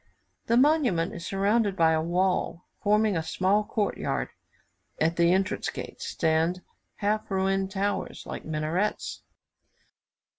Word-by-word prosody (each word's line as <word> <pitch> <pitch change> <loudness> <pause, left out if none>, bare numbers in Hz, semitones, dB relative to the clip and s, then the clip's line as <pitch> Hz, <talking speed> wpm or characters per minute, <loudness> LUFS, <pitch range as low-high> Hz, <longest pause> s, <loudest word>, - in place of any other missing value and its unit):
The 235 - +3
monument 255 - +3
is 170 - -6
surrounded 200 +1 +1
by 165 -3 +4
a 160 -1 +2
wall, 175 0 0 0.2
forming 210 -1 +3
a 165 - +1
small 190 +6 +1
court 210 -1 -2
yard; 65 -2 -2 0.7
at 165 +2 +2
the 170 0 +4
entrance 190 +2 0
gates - - -7
stand 165 +2 +1 0.3
half 210 +1 -1
ruined 195 0 0
towers, 200 +1 -2
like - - -6
minarets. 160 +6 -2
190 Hz, 125 wpm, -27 LUFS, 170-210 Hz, 0.7 s, by